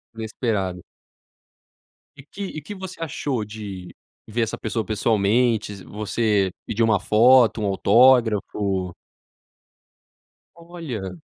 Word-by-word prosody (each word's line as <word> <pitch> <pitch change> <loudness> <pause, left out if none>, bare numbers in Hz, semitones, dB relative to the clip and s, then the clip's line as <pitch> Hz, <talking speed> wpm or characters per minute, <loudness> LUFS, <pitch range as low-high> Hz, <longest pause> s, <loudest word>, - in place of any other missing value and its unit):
Inesperado. 110 -5 -3 1.4
E 140 - -12
que 175 +8 -11
e 170 -5 -6
que 185 +8 -8
você 185 -2 -9
achou 140 -7 -3
de 100 -4 -8 0.3
ver 115 +2 -2
essa 115 - -2
pessoa 110 0 -3
pessoalmente? 110 +1 +1
Você 105 -2 0
pediu 115 +1 0
uma 110 -3 +3
foto, 120 +1 +5
um - - -1
autógrafo? 105 -4 +3 1.6
Olha. 145 - -7
110 Hz, 100 wpm, -23 LUFS, 100-125 Hz, 1.6 s, foto